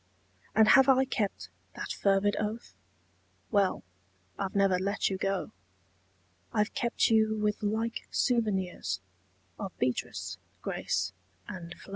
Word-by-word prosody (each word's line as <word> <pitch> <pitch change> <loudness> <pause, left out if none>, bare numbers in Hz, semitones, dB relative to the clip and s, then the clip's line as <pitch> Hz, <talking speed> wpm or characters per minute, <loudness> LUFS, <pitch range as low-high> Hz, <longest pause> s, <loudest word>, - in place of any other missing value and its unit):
And 220 0 +6
have 270 0 +7
I 265 0 +6
kept 215 -6 -2 0.3
that - - -5
fervid 200 +1 +2
oath? 215 +2 -4 0.8
Well 200 -3 +2 0.6
I've 195 -1 -2
never 195 -2 +4
let 200 +1 0
you 190 - -1
go: 195 -1 -1 1.0
I've 210 -1 +1
kept 235 -1 +1
you 220 -1 +4
with 210 0 0
like 220 +2 -1
souvenirs 190 - 0 0.6
Of 195 -3 -6
Beatrice, 125 -1 -2 0.2
Grace 95 0 -1 0.3
and 175 -2 -7
Flo. - - -14
205 Hz, 120 wpm, -30 LUFS, 190-220 Hz, 1.0 s, have